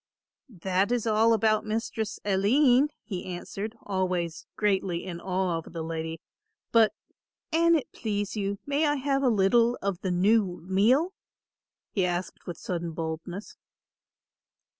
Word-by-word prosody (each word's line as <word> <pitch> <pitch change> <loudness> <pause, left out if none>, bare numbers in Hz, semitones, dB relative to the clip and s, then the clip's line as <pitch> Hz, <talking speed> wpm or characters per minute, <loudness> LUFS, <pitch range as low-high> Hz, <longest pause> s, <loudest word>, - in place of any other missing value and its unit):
"That 190 +3 +1
is 245 -2 +1
all 225 +1 +4
about 215 -1 +3
Mistress 220 0 -3
Aline," 245 +8 +4
he 190 -5 -5
answered, 195 +5 -6
always 180 -4 -2
greatly 190 -4 0
in 170 -2 -6
awe 185 -2 0
of 165 - -12
the 165 -1 -4
lady, 160 0 -4 0.5
"but, 225 -2 +5 0.6
an 335 +1 +5
it 300 - -2
please 205 -2 -3
you, 200 -1 -2
may 285 +2 +1
I 290 - +2
have 275 0 0
a 265 - +3
little 230 +3 +3
of 195 -3 -2
the 190 - -1
new 190 +1 +2
meal?" 250 - +3 0.8
he 195 - +1
added 180 0 -1 0.2
with 175 - -5
sudden 175 -6 -4
boldness. 165 +4 -5
200 Hz, 140 wpm, -27 LUFS, 180-230 Hz, 0.8 s, but